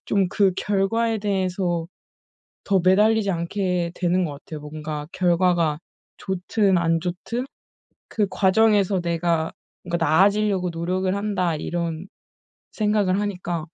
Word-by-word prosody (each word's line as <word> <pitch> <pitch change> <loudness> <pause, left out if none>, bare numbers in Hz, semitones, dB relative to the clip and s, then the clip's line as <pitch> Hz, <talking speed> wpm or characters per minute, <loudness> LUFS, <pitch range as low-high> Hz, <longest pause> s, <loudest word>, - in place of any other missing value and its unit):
좀 195 -3 +1
그 195 -1 +2
결과에 220 +3 0
대해서 185 -4 -1 0.8
더 195 -2 +2
매달리지 210 +2 +4
않게 175 0 -1
되는 180 0 +1
것 150 - -3
같아요. 150 +2 -9
뭔가 150 0 -6
'결과가 175 -3 +2 0.4
좋든 190 +1 0
안 165 -1 +1
좋든 190 +9 -4 0.6
그 210 -2 0
과정에서 200 -1 +3
내가 170 -1 0 0.3
뭔가 170 -1 -2
나아지려고 195 +3 +3
노력을 185 +3 -1
한다.' 185 -5 -1
이런 170 +2 -3 0.7
생각을 210 -3 +1
하니까 175 -5 -3
185 Hz, 255 characters per minute, -23 LUFS, 170-200 Hz, 0.8 s, 매달리지